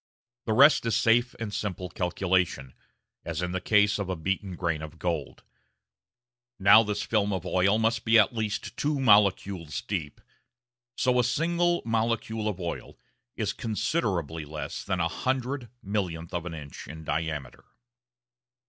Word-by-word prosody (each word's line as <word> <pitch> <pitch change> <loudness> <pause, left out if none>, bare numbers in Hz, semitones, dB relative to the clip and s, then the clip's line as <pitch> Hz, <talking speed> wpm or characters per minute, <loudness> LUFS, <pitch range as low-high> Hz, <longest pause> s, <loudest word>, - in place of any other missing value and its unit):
The 110 - 0
rest 135 0 +6
is 115 - +1
safe 120 +2 +3
and 110 -2 -4
simple 95 -4 -3
calculation, 90 -7 -1 0.5
as 85 +1 -3
in 90 - -2
the 95 0 -2
case 105 +1 +3
of 100 - -2
the 95 - -2
beaten 95 +3 -3
grain 85 -3 -2
of 80 +1 -9
gold. 80 -6 -3 1.1
Now 100 +2 +7
this 105 -1 -2
film 105 -2 +1
of 95 -4 -3
oil 95 +3 +2
must 115 0 +1
have - - -28
been 115 +1 +6
at 105 - +3
least 110 -2 -3
two 145 -1 0
molecules 100 - +3
deep, 85 -8 -4 0.8
so 125 -1 +2
a - - +4
single 170 +7 +1
molecule 115 -1 -1
of 100 -3 -3
oil 85 -2 -5 0.4
is - - -1
considerably 95 - -2
less 75 +1 -6
than 95 -2 -2
a 85 - +2
hundred 130 +6 -2
millionth 90 -5 -3
of 85 0 -3
an 85 - -5
inch 70 -3 -9
in 80 +2 -9
diameter. 80 -4 -4
100 Hz, 155 wpm, -27 LUFS, 85-115 Hz, 1.1 s, Now